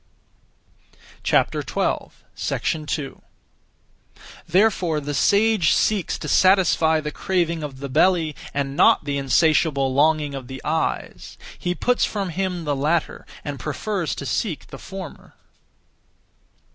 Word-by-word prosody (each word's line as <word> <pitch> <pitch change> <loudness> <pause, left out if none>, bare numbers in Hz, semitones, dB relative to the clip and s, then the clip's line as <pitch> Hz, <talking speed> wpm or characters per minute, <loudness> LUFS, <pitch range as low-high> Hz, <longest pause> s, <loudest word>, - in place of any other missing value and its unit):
2. 150 -3 -2 1.3
Therefore 180 -4 +2
the 145 0 -4
sage 205 +3 +3
seeks 210 -5 +1
to - - -7
satisfy 180 -4 +4
(the 150 -1 -4
craving 170 -3 -1
of) 145 -3 -6
the 140 - -5
belly, 160 +2 +2 0.2
and 140 -1 -2
not - - +5
the 140 -1 -1
(insatiable 140 -1 +2
longing 150 +1 +2
of 135 -2 -7
the) 130 +1 -7
eyes. 160 +1 -3 0.2
He 175 0 -3
puts 250 +5 +1
from 200 -3 -1
him 180 0 -2
the 145 -2 -1
latter, 155 +4 -1 0.2
and 145 -2 -5
prefers 170 +1 -3
to 140 - -6
seek 165 - -2
the - - -9
former. 190 -5 -9
160 Hz, 115 wpm, -22 LUFS, 145-185 Hz, 1.3 s, not